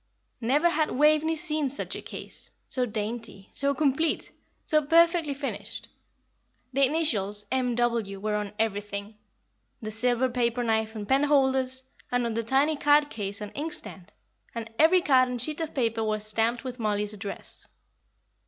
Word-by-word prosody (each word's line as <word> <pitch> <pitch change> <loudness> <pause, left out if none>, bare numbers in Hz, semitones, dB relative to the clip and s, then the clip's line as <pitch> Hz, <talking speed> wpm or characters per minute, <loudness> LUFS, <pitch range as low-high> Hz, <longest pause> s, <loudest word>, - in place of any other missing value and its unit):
Never 280 +9 +3
had 315 -2 +1
Waveney 305 +3 +3
seen 305 -2 -1
such 280 - -2
a - - -6
case, - - -3 0.2
so 250 -1 0
dainty, 215 -2 -5
so 280 0 +2
complete, 305 +2 +1 0.3
so 305 -2 +3
perfectly 330 -1 +3
finished. 280 0 -5 0.8
The 275 +1 +3
initials 210 -10 +3
"M. 255 -2 0
W." 230 -5 0
were 210 +1 -2
on 210 -1 -3
everything 205 -1 -3 0.6
the 215 -1 -6
silver 245 +3 +2
paper 240 -1 0
knife 220 -1 0
and 210 -2 -5
penholders, 265 -1 +2 0.3
and 245 -1 +1
on 230 - -2
the 230 - -1
tiny 275 +6 +2
card 290 0 +4
case 200 -1 -4
and 210 - -6
inkstand; 275 - -5 0.4
and 230 -1 -6
every 340 +4 +6
card 255 -2 +4
and 250 -1 -3
sheet 305 +7 -2
of 320 - -4
paper 230 -4 0
was 215 -1 -1
stamped 225 +3 0
with 255 -1 -6
Mollie's 210 -1 -1
address. 200 -1 -5
245 Hz, 155 wpm, -27 LUFS, 215-290 Hz, 0.8 s, every